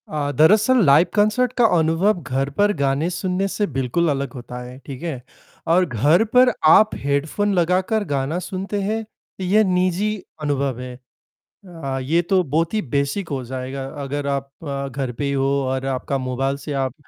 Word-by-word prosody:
अ, 145 Hz, -2 st, -2 dB
दरअसल 215 Hz, +9 st, +5 dB
live 150 Hz, +5 st, +6 dB
concert 220 Hz, +4 st, +2 dB
का 240 Hz, -, +5 dB
अनुभव 170 Hz, +5 st, +2 dB
घर 135 Hz, 0 st, -2 dB
पर 205 Hz, 0 st, +4 dB
गाने 140 Hz, +4 st, 0 dB
सुनने 180 Hz, +2 st, -1 dB
से 205 Hz, +1 st, -1 dB
बिल्कुल 135 Hz, +6 st, +1 dB
अलग 140 Hz, -3 st, -2 dB
होता 125 Hz, -1 st, -8 dB
है, 125 Hz, +1 st, -9 dB
ठीक 135 Hz, +2 st, -8 dB
है? 155 Hz, -8 st, -4 dB, 0.5 s
और 175 Hz, +3 st, +4 dB
घर 150 Hz, -, +3 dB
पर 250 Hz, 0 st, +6 dB, 0.2 s
आप 215 Hz, +7 st, +6 dB
हेडफोन 150 Hz, +9 st, -1 dB
लगाकर 185 Hz, +4 st, +1 dB
गाना 140 Hz, +5 st, -1 dB
सुनते 195 Hz, +2 st, -4 dB
हैं, 220 Hz, +3 st, -2 dB, 0.4 s
ये 200 Hz, +4 st, +3 dB
निजी 185 Hz, +2 st, +1 dB, 0.3 s
अनुभव 140 Hz, -4 st, -1 dB
है। 125 Hz, 0 st, -7 dB, 0.7 s
अ, 150 Hz, -7 st, -5 dB
ये 160 Hz, +7 st, +1 dB
तो 185 Hz, +1 st, +1 dB
बहुत 165 Hz, +4 st, -1 dB
ही 215 Hz, -, +1 dB
बेसिक 140 Hz, -, -2 dB
हो 135 Hz, -3 st, -3 dB
जाएगा। 130 Hz, +2 st, -5 dB, 0.2 s
अगर 140 Hz, +1 st, -3 dB
आप 140 Hz, -1 st, -2 dB
अ, 140 Hz, -2 st, -3 dB
घर 135 Hz, -1 st, -4 dB
पे 135 Hz, +4 st, -4 dB
ही 140 Hz, -, -1 dB
हो 135 Hz, -1 st, +1 dB, 0.2 s
और 130 Hz, 0 st, -2 dB
आपका 135 Hz, +1 st, -2 dB
मोबाइल 135 Hz, +1 st, -2 dB
से 145 Hz, +1 st, -6 dB
आप 135 Hz, -2 st, -1 dB
150 Hz, 175 wpm, -21 LUFS, 135-185 Hz, 0.7 s, live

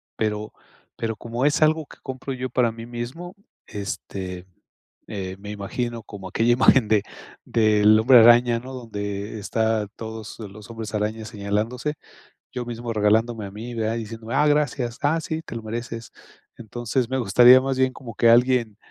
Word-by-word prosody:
Pero 105 Hz, -1 st, -2 dB, 0.4 s
pero 110 Hz, -1 st, -3 dB
como 120 Hz, +5 st, -3 dB
es 145 Hz, +1 st, +2 dB
algo 155 Hz, 0 st, +3 dB
que -, -, -16 dB
compro 130 Hz, 0 st, -6 dB
yo 130 Hz, 0 st, -4 dB
para 125 Hz, -1 st, +2 dB
mí 115 Hz, 0 st, -9 dB
mismo, 125 Hz, +10 st, -7 dB, 0.3 s
este, 95 Hz, -3 st, -6 dB, 0.6 s
eh, 95 Hz, -3 st, -5 dB
me 105 Hz, +1 st, -9 dB
imagino 115 Hz, +3 st, -4 dB
como 100 Hz, -3 st, -9 dB
aquella 120 Hz, +1 st, +2 dB
imagen 130 Hz, -1 st, +5 dB
de, 105 Hz, -2 st, +3 dB, 0.4 s
del 110 Hz, -1 st, +4 dB
hombre 125 Hz, +2 st, +7 dB
araña, 120 Hz, +1 st, +6 dB
¿no?, 130 Hz, +2 st, -9 dB
donde 105 Hz, -3 st, -5 dB
está 110 Hz, +1 st, 0 dB
todos 110 Hz, -1 st, -8 dB
los 105 Hz, 0 st, -10 dB
hombres 115 Hz, -2 st, -7 dB
araña 110 Hz, +1 st, -2 dB
señalándose. 110 Hz, +6 st, -2 dB, 0.6 s
Yo 125 Hz, -1 st, -4 dB
mismo 120 Hz, 0 st, -5 dB
regalándome 110 Hz, +1 st, +1 dB
a -, -, -10 dB
mí 115 Hz, +4 st, -7 dB
de 110 Hz, -1 st, -1 dB
ahí 115 Hz, +1 st, -2 dB
diciéndome: 115 Hz, +1 st, -7 dB
"Ah, 150 Hz, -, +4 dB
gracias. 135 Hz, -5 st, 0 dB
Ah, 150 Hz, +3 st, +2 dB
sí, 160 Hz, 0 st, -4 dB
te 135 Hz, -, -9 dB
lo 115 Hz, -, -4 dB
mereces". 115 Hz, +1 st, -6 dB, 0.5 s
Entonces, 120 Hz, +2 st, -2 dB
me 130 Hz, -, -1 dB
gustaría 120 Hz, +4 st, +7 dB
más 135 Hz, 0 st, -2 dB
bien, 130 Hz, 0 st, +2 dB
como 120 Hz, -5 st, -10 dB
que 115 Hz, -, +4 dB
alguien 120 Hz, -2 st, +3 dB
115 Hz, 170 wpm, -23 LUFS, 105-125 Hz, 0.6 s, hombre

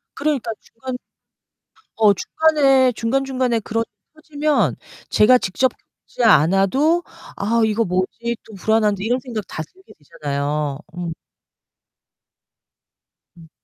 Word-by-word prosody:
그러니까 280 Hz, -6 st, -1 dB
중간 255 Hz, +2 st, -7 dB, 1.0 s
어 215 Hz, -2 st, +5 dB
중간에 270 Hz, -, +3 dB
중간 245 Hz, +4 st, -1 dB
중간에 255 Hz, -3 st, 0 dB
그런 225 Hz, +2 st, -2 dB
일이 205 Hz, -1 st, -61 dB
터지면 305 Hz, -1 st, 0 dB, 0.3 s
제가 250 Hz, +4 st, +6 dB
직접 245 Hz, +5 st, 0 dB, 0.3 s
겪지 245 Hz, -, -2 dB
않아도 215 Hz, -, +4 dB, 0.3 s
'아, 230 Hz, +3 st, +1 dB
이거 220 Hz, +1 st, +1 dB
뭐지? 185 Hz, +6 st, -2 dB
또 220 Hz, -, -13 dB
불안한데.' 210 Hz, 0 st, +1 dB
이런 245 Hz, +3 st, +1 dB
생각 230 Hz, -6 st, -6 dB
다 155 Hz, -, -5 dB
들게 380 Hz, -, -17 dB
되잖아요. 145 Hz, 0 st, -3 dB, 0.2 s
음. 175 Hz, -2 st, -4 dB, 2.3 s
음. 165 Hz, -1 st, -15 dB
230 Hz, 240 characters per minute, -20 LUFS, 195-260 Hz, 2.3 s, 제가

